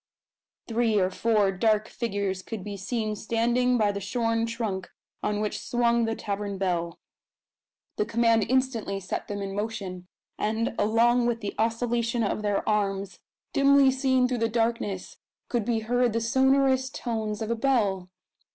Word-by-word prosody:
Three 225 -2 +2
or 185 0 +1
four 210 -1 +2
dark 215 +2 +1
figures 200 -5 -2
could 210 0 -6
be 205 0 -5
seen 215 +2 -2
standing 235 +3 +1
by 210 -3 +2
the 200 - -4
shorn 230 +2 0
trunk 220 -5 -3 0.3
on 210 0 -1
which 210 0 -2
swung 235 -1 +1
the 225 0 -1
tavern 200 -1 -4
bell. 175 -3 -1 1.0
The 210 - +1
command 230 -1 +3
instantly 250 -6 0
set 185 - -4
them 205 -1 -4
in 195 0 -4
motion; 195 -4 -4 0.3
and, 220 +2 0
along 235 +3 +3
with 230 -1 -1
the 205 - -4
oscillation 230 +1 0
of 210 - -1
their 205 -1 -1
arms 200 -2 -1 0.3
dimly 275 -1 +5
seen 260 -1 +2
through 250 -1 -2
the 230 0 +1
darkness 225 -4 -1 0.3
could 235 -4 0
be 230 -2 0
heard 245 +1 +1
the 230 - +1
sonorous 265 +2 +3
tones 220 -5 -3
of 220 0 -3
a - - +1
bell. 210 -7 +1
225 Hz, 155 wpm, -27 LUFS, 205-240 Hz, 1.0 s, dimly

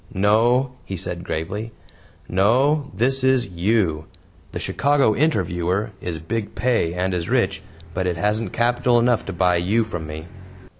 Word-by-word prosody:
"No," 115 +7 +3
he 95 - -6
said 85 0 -4
gravely. 105 +8 -4 0.6
"No 130 - +2
this 130 +7 +2
is 130 -2 +3
YOU. 90 -3 0 0.5
The - - -5
CHICAGO 140 -5 +2
INTERVIEWER 95 - 0
is 85 -2 -4
big 105 +7 -4
pay 105 -6 +1
and 90 +1 -1
is 85 0 -3
rich, 100 -7 +1 0.3
but 95 +1 -1
it 90 -2 -1
hasn't 105 +2 -1
capital 120 +1 +2
enough 120 -1 +2
to 95 - -4
buy 90 0 +2
you 100 +7 +1
from 85 -8 -6
me." 80 +1 -7
105 Hz, 150 wpm, -22 LUFS, 90-120 Hz, 0.6 s, No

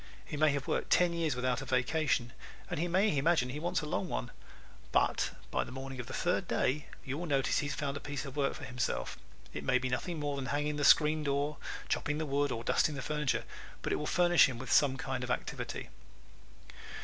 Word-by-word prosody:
He - - -6
may 155 +1 +4
have 140 -1 -3
worked - - -1
ten 175 -1 +4
years 165 -5 0
without 125 0 0
a - - -6
vacation 130 -1 +1 0.4
and 170 - -1
he 175 - +1
may 190 +1 +3
imagine 140 -2 +3
he 140 +4 -4
wants 175 +3 0
a - - -5
long 175 +4 -2
one, 125 -4 -3 0.6
but - - +2 0.2
by - - +1
the - - -10
morning 135 0 -6
of 120 - -5
the 130 - -7
third 180 +1 0
day 145 +3 0 0.2
you 135 +3 -3
will 175 - -4
notice 135 -3 +2
he 145 - -1
has - - -3
found 140 -1 -2
a - - -3
piece 145 -1 -5
of 135 0 -8
work 140 -2 +1
for - - -9
himself. 125 - -2 0.4
It - - -5
may 130 - +3
be 130 0 -2
nothing 155 +6 -2
more 145 -1 -2
than 135 -1 -3
hanging 145 +1 -1
the 145 - -1
screen 155 +1 +6
door, 140 +1 0 0.3
chopping 150 0 0
the 160 - -1
wood 145 -1 +1
or 115 -1 -3
dusting 150 - +2
the 135 - -4
furniture, 150 -3 0 0.4
but - - 0
it - - +1
will 150 - -3
furnish 175 -1 +5
him 125 - -5
with 125 +1 -6
some 135 -3 +5
kind 130 -2 -3
of 125 - -4
activity. - - -3
145 Hz, 230 wpm, -32 LUFS, 130-155 Hz, 0.6 s, screen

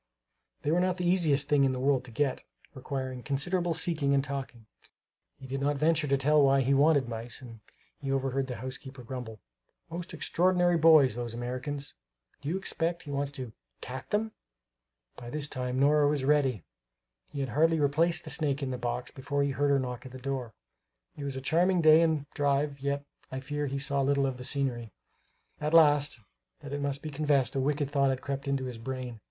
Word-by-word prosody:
They 150 - +1
were 170 - +3
not 180 0 +1
the 180 -1 -1
easiest 155 -6 +2
thing 145 -2 +4
in 135 -1 +2
the 130 - -3
world 135 -1 +2
to - - -10
get, 135 +3 0 0.3
requiring 130 -1 -5
considerable 170 +6 -1
seeking 150 -5 +2
and 135 - +2
talking. 135 -5 -6 0.7
He 135 - -12
did 135 +1 -4
not 145 +1 +1
venture 155 +1 +2
to 140 0 +2
tell 150 +3 +4
why 135 -1 +4
he 135 +2 +2
wanted 140 -1 +4
mice; 115 0 -5
and 115 -3 -11 0.4
he 135 -1 -3
overheard 135 0 0
the 125 - -4
housekeeper 130 +1 -7
grumble: 115 -4 -7 0.5
"Most 175 +2 -5
extraordinary 175 0 +2
boys, 155 -6 +6
those 120 0 -5
Americans! 130 +4 -4 0.5
Do 145 - -4
you 180 - 0
expect 170 -2 -2
he 145 - -8
wants 140 0 -1
to 125 -5 -6 0.3
cat 130 +1 -7
them?" 220 +1 0 0.9
By 120 -1 -8
this 150 +2 -3
time 130 -2 -3
Nora 145 +1 +4
was 145 -2 0
ready; 135 - +2 0.7
he 140 - -6
had 135 - -2
hardly 160 +4 +3
replaced 160 +4 +2
the 155 - -6
snake 145 -1 0
in 130 - -2
the 125 - -4
box 120 +1 -3
before 140 +1 -2
he 140 - 0
heard 145 +2 +1
her 140 - +4
knock 125 -2 -4
at - - -12
the 130 - -8
door. 130 -3 -4 0.6
It 145 - -6
was 140 -1 -3
a 130 - -4
charming 175 +6 +2
day 155 0 +7
and 155 -3 +1
drive, 140 0 0
yet 140 +1 -2 0.3
I 130 - -3
fear 145 +2 -3
he 140 +1 -3
saw 140 0 0
little 140 0 +2
of 135 -2 -2
the 125 - -8
scenery. 125 -5 -1 0.7
Alas, 150 -3 +4 0.4
that 145 -1 -7
it 145 - -2
must 140 0 -2
be 155 - -5
confessed, 145 -3 +1
a - - +1
wicked 145 +1 0
thought 140 -2 +3
had 130 -1 -1
crept 140 0 -4
into 135 -1 0
his 125 -3 -6
brain. 125 -1 -5
140 Hz, 200 wpm, -29 LUFS, 130-150 Hz, 0.9 s, day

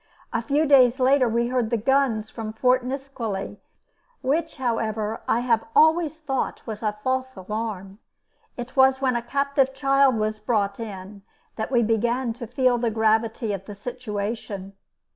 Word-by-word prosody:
A 230 - 0
few 285 +7 +1
days 260 -3 +5
later 260 -1 +4
we 235 +1 0
heard 250 -3 0
the 235 - +1
guns 230 -2 +1
from 220 -2 -6
Fort 250 +2 +2
Nisqually, 245 -7 -5 0.6
which, 320 +5 0
however, 225 -3 -2
I 235 - +2
have 230 -3 +2
always 315 0 +4
thought 270 -4 -3
was 215 -2 -6
a 210 -1 -2
false 260 0 -1
alarm. 200 0 -5 0.6
It 245 +1 -7
was 265 0 +5
when 260 -2 +1
a 235 - 0
captive 275 +1 0
child 275 -1 +3
was 215 0 -1
brought 210 -2 0
in 200 -2 -8 0.3
that 220 - -3
we 240 -2 +3
began 235 +2 0
to 235 0 -8
feel 250 0 +2
the 235 -1 +1
gravity 220 0 +1
of 195 -1 -6
the 205 - -8
situation. 210 -3 -5
235 Hz, 160 wpm, -24 LUFS, 215-260 Hz, 0.6 s, days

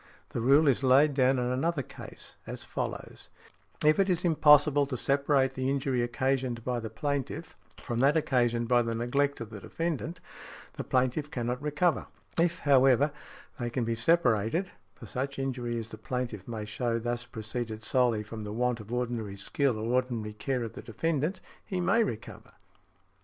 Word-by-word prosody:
The - - -3
rule 140 +6 +5
is 135 -1 +3
laid 140 +3 +5
down 130 -1 +3
in 125 - 0
another 140 +4 0
case - - -10
as - - -6
follows: - - -5 0.6
If 155 +3 +5
it 195 - +4
be 180 -3 +2
impossible 150 -3 +5
to 130 -2 -3
separate 140 0 +2
the 130 0 -1
injury 135 -2 0
occasioned 125 -1 -1
by 125 0 -1
the 115 -1 -5
plaintiff 145 +6 -3 0.2
from 120 -3 -4
that 140 +5 +4
occasioned 120 -5 +1
by 120 0 +4
the 115 -1 -2
neglect 140 +4 0
of 110 -1 -7
the 105 - -7
defendant, 165 - -3 0.5
the - - -5
plaintiff 130 +4 0
cannot 125 -2 -3
recover; 150 +3 +1 0.3
if, 170 +1 +2
however, 135 0 +5 0.5
they 120 -1 -2
can 120 +1 -1
be 115 0 0
separated, 125 - +2 0.2
for - - -11
such 135 +2 -3
injury 125 -3 -2
as 115 -1 -5
the - - -9
plaintiff 120 -6 -4
may 110 -3 -4
show 115 +2 -1
thus 120 +1 -3
preceded 110 0 -5
solely 120 -4 +2
from 110 +1 -7
the 105 - -5
want 120 +2 0
of 110 +1 -10
ordinary 120 -4 -2
skill 125 +5 0
or 115 +3 -2
ordinary 120 -4 -1
care 125 +3 -2
of 115 - -6
the - - -8
defendant, 155 - -1 0.2
he 185 - -3
may 230 +6 +3
recover. 115 - -6
125 Hz, 175 wpm, -29 LUFS, 115-145 Hz, 0.6 s, rule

